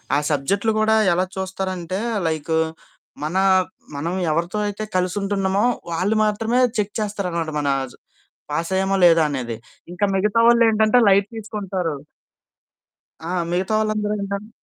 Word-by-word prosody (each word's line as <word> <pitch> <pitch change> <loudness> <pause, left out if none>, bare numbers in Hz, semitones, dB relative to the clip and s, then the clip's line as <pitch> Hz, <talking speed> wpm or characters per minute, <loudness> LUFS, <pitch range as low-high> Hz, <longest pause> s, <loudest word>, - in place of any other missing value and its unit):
ఆ - - +4
సబ్జెక్ట్‌లు 200 +10 0
కూడా 220 0 +3 0.2
ఎలా 180 +2 +1
చూస్తారంటే 190 -1 -3 0.3
లైకు 160 0 -1 0.7
మన 155 +4 -3 0.6
మనం 160 +5 -3 0.2
ఎవరితో 170 +6 -1
అయితే 205 +1 -4
కలిసి 180 0 0
ఉంటున్నామో 195 0 0 0.3
వాళ్ళు 185 +6 0
మాత్రమే 225 +3 0 0.2
చెక్ 210 -1 -1
చేస్తారనమాట. 180 -6 -2
మన 145 -1 0 0.8
పాస్ 165 +3 -1
అయ్యామా 190 +1 +1
లేదా 165 -2 +6
అనేది. 125 -5 -4 0.4
ఇంకా 190 +3 +1
మిగతా 210 +3 +2
వాళ్ళు 235 0 +6
ఏంటంటే 220 +2 +4
లైట్ 195 0 +4
తీసుకుంటారు. 195 -6 -3 1.3
ఆ! - - -5 0.2
మిగతా 185 +4 -1
వాళ్ళందరూ 215 -1 -1
ఏంటంటే 200 +2 -4
195 Hz, 125 wpm, -21 LUFS, 170-210 Hz, 1.3 s, లేదా